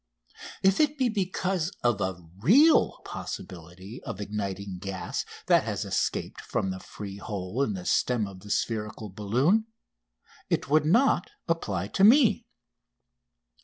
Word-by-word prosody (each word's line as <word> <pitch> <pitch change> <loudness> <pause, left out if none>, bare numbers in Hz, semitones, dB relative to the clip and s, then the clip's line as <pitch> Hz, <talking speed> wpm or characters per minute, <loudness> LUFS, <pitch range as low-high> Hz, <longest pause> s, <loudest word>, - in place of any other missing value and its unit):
If 195 +1 +4
it 300 -1 +2
be 260 -2 +2
because 185 -4 -1
of 120 -4 +2
a 95 0 -1 0.2
real 270 - +5
possibility 90 +5 -8
of 95 - -7
igniting 100 -2 -4
gas 95 -1 -4 0.2
that - - +4
has - - -3
escaped - - -2
from 95 - -2
the 95 - -5
free 100 0 -8
hole 100 +4 -4
in 115 -7 +1
the 90 -2 -6
stem 120 -4 +1
of 95 -2 -9
the 105 +2 -13
spherical 105 0 -2
balloon 130 - +1 0.8
it - - 0
would 155 0 +4
not 230 - +3 0.2
apply 165 -1 -1
to 190 - +1
me. 235 +2 +6
110 Hz, 135 wpm, -27 LUFS, -, 0.8 s, me